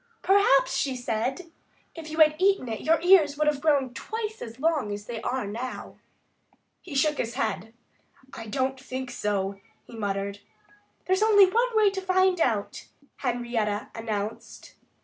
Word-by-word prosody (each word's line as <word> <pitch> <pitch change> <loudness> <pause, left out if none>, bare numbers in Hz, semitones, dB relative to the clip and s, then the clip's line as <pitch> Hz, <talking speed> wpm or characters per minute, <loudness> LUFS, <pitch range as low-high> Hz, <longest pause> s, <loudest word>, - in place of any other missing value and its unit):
"Perhaps," 385 -8 +4
she 270 -2 -1
said, 250 +8 -3 0.4
"if 325 -2 -9
you 315 - -6
had 305 -1 +7
eaten 390 -7 +2
it 220 -2 -4
your 325 +1 +2
ears 335 -6 +5
would 305 - +1
have 295 -2 +1
grown 280 -5 +2
twice 440 - -5
as 230 +2 -8
long 305 -8 0
as 205 0 -6
they 230 -1 -6
are 255 -1 -2
now." 235 +5 -6 0.8
He 325 -6 -9
shook 300 +1 +2
his 235 +1 -3
head. 220 -4 -2 0.6
"I 225 - -8
don't 265 +3 -1
think 260 -1 -6
so," 200 -1 -2 0.3
he 235 - -12
muttered. 200 -1 -3 0.7
"There's 375 +2 +1
only 420 -2 +7
one 465 +5 0
way 420 -2 +5
to 385 -1 -4
find 375 -1 +2
out," 215 -7 -1 0.3
Henrietta 235 -5 -2
announced. 215 -1 -5
265 Hz, 155 wpm, -26 LUFS, 225-350 Hz, 0.8 s, had